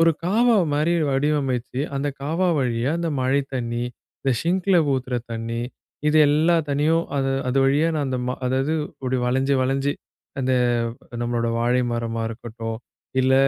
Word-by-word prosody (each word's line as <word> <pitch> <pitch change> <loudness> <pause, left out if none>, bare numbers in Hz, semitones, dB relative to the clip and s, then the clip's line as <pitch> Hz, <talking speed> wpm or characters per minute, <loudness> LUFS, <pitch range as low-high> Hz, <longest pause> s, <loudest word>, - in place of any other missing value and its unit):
ஒரு 165 0 +6
காவா 230 +5 +4 0.2
மாரி 150 +4 +2 0.2
வடிவமைச்சு 135 -3 0
அந்தக் 140 0 -2
காவா 165 +6 +1
வழியா 125 -1 0
அந்த 170 -1 -1
மழைத் 135 +2 +1
தண்ணி, 120 -1 -2 0.4
அந்த 135 - 0
ஸிங்க்ல 185 +2 +2 0.2
ஊத்துற 130 -1 -2 0.2
தண்ணி, 115 +1 -3 0.5
இது 155 - +3
எல்லாம் 160 +2 +3
தண்ணியும் 155 +4 +2
அது 135 -1 +1 0.2
அது 130 +2 +1
வழியா 145 +4 +3
நான் 145 -3 0
அந்த 130 -1 -1
மா 125 - -1
அதாவது 135 +4 +1 0.2
இப்படி 130 -1 -3
வளைஞ்சு 130 +3 +2
வளைஞ்சு, 135 +2 +1 0.5
அந்த 130 0 +1 0.7
நம்மளோட 120 -1 0
வாழை 120 +2 +2
மரமா 115 -1 -2
இருக்கட்டும், 115 -1 -6 0.4
இல்ல 130 +1 +3
135 Hz, 145 wpm, -23 LUFS, 125-150 Hz, 0.7 s, ஒரு